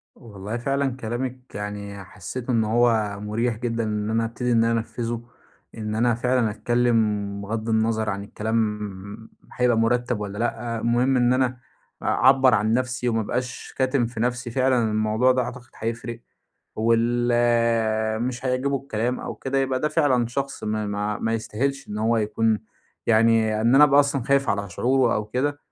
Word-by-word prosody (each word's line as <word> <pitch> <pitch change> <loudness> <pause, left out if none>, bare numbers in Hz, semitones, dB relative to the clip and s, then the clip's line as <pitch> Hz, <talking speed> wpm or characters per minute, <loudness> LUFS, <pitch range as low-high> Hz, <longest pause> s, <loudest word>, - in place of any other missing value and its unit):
والله 105 -1 -7
فعلًا 135 +1 -1
كلامِك 125 +2 -5
يعني 100 -1 -6
حسّيت 105 +7 -7
إن 115 -3 +2
هو 110 -2 +2
مُريح 115 +3 -1
جدًا 115 0 -2
إن 105 0 -2
أنا 115 +1 +1
أبتدي 120 +2 -2
إن 115 -1 +4
أنا 115 0 +2
أنفّذه. 115 0 -4 0.5
إن 105 -1 -4
أنا 120 +2 +2
فعلًا 125 -1 +1
أتكلّم 105 -3 0
بِغَض 110 +2 -4
النَظَر 110 -1 +1
عن 100 0 -4
الكلام 105 -1 -3 0.2
هيبقى 125 -2 +2
مُرتَّب 120 0 +1
والّا 100 0 -5
لأ. 115 0 -2
المهم 120 +3 +2
إن 120 0 +3
أنا 130 -1 +1 0.4
أعبّر 130 -1 +4
عن 110 +1 +1
نفسي 125 0 -1
وما 115 -1 +1
أبقاش 125 +3 -4
كاتم 130 -2 +2
في 115 -1 -7
نفسي. 125 0 -1
فعلًا 125 -2 +2
الموضوع 110 +4 +2
ده 130 0 +1
أعتقد 120 0 -7
هيفرق 115 +1 -4 0.6
واللي 115 -1 +2
مش 120 +1 -3
هيعجبه 130 +2 0
الكلام 125 -2 -2
أو - - -5
كده، 135 +1 -2
يبقى 130 -1 0
ده 150 - +1
فعلًا 145 -6 +2
شخص 135 +3 -4
ما 110 0 -1
ما 105 +1 -2
ما 115 - -1
يستاهلش 130 +5 -2
إن 105 0 -4
هو 115 +2 +2
يكون 110 0 +1 0.5
يعني 110 -1 +3
إن 120 +3 +4
أنا 150 +2 +9
أبقى 145 0 +6
أصلًا 140 -3 0
خايف 140 -1 +2
على 100 -1 -2
شعوره 125 +5 +2
أو 105 - -1
كده. 145 +6 -1
115 Hz, 165 wpm, -24 LUFS, 110-125 Hz, 0.6 s, أنا